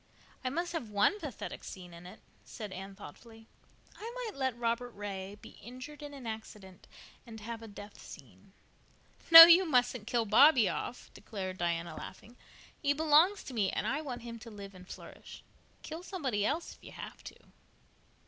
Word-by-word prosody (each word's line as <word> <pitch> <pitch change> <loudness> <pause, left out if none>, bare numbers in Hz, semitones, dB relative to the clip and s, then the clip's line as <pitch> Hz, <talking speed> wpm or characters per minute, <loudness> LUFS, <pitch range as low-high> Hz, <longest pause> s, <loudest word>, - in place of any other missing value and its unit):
"I 255 - 0
must 340 +5 -3
have 280 -10 -4
one 210 - +2
pathetic 290 - -7
scene 180 -2 -10
in 170 +1 -11
it," 185 - -13 0.2
said 210 -3 -8
Anne 195 +1 -8
thoughtfully. 225 +5 -13 0.5
"I 450 +2 -7
might - - -5
let 260 -3 -2
Robert 235 +1 -1
Ray 200 -1 -6
be - - -13
injured 255 +6 -10
in 290 -1 -8
an 265 -3 -10
accident 210 -4 -9 0.4
and 220 -1 -9
have 230 +1 -6
a 225 - -9
death 205 0 -11
scene." - - -14 0.8
"No, 330 0 +15
you 340 +3 +8
mustn't 250 - +1
kill 235 -2 0
Bobby 250 +1 +6
off," 245 - -5
declared 190 -3 -7
Diana, 170 -1 -2
laughing. 215 +8 -10 0.5
"He 285 -1 +2
belongs 315 +6 +4
to 265 - -9
me 205 -5 +1
and - - -2
I 290 +3 -1
want 250 -6 -6
him 230 -1 -8
to 230 - -11
live 200 -2 -10
and 180 -1 -14
flourish. - - -11 0.4
Kill 320 +2 -7
somebody 280 - -2
else 320 +5 -3
if - - -22
you - - -11
have - - -10
to." - - -9
230 Hz, 175 wpm, -31 LUFS, 200-290 Hz, 0.8 s, No